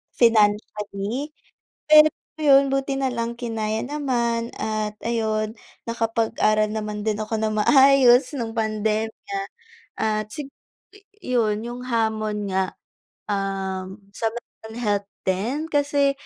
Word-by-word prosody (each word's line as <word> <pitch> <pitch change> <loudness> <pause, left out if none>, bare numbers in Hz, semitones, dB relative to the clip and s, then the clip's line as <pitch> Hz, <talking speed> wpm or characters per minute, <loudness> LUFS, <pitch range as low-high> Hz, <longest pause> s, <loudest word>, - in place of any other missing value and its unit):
financially, 215 +3 +1 0.5
pero 305 0 +8 0.3
'yun 275 -2 +5
buti 275 0 -1
nalang 235 -3 -2
kinaya 220 -2 -2
naman 240 -5 -1
at 215 -1 -2
ayun 220 -2 -1 0.3
nakapag-aral 225 -2 +1
naman 210 -1 -4
din 215 -1 0
ako 220 +1 -2
ng 215 0 -1
maayos 270 -1 +6
no'ng 230 -4 -4
pandemya 215 -1 -2 0.6
at 215 -1 -1
sig 275 +5 -8 0.4
i 410 - -17 0.3
'yun 220 -3 +1
'yung 240 +1 -6
hamon 215 -3 -1
nga. 190 0 -1 0.6
Um, 195 0 -3
sa 225 - -2
mental 220 -2 -10
health 205 -2 0 0.2
din 240 - -1
kasi 285 -1 +2
225 Hz, 110 wpm, -23 LUFS, 215-255 Hz, 0.6 s, pero